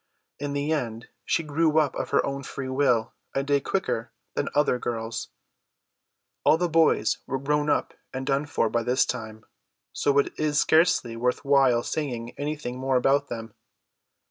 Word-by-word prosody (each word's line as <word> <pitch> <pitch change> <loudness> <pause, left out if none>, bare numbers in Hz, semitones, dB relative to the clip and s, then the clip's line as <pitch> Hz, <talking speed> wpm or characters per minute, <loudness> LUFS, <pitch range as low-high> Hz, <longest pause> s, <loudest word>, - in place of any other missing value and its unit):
In 145 0 -3
the 145 +2 -1
end 115 -6 -3 0.2
she 165 - +1
grew 155 +1 +1
up 150 -3 +3
of - - -4
her - - +2
own 140 0 -3
free 135 -1 -6
will 130 -4 +1 0.2
a 135 - +1
day 140 0 +2
quicker 120 -11 -2 0.2
than - - -1
other 145 -4 +3
girls. 115 -1 -4 1.1
All 155 - +5
the 175 +1 +1
boys 160 -9 +3
were 135 - -1
grown 145 +2 0
up - - +1 0.2
and 130 0 -4
done 140 +2 0
for 115 - +1
by 120 +2 0
this 125 +2 +2
time; 110 -3 -6 0.5
so 140 -1 +1
it 140 - +2
is 150 -1 +1
scarcely 160 -8 +3
worth 125 +4 -1
while 135 -4 +4
saying 120 -6 -3
anything 145 -4 -4
more 130 0 0
about 140 +3 +3
them. 115 -1 -6
135 Hz, 170 wpm, -26 LUFS, 120-150 Hz, 1.1 s, All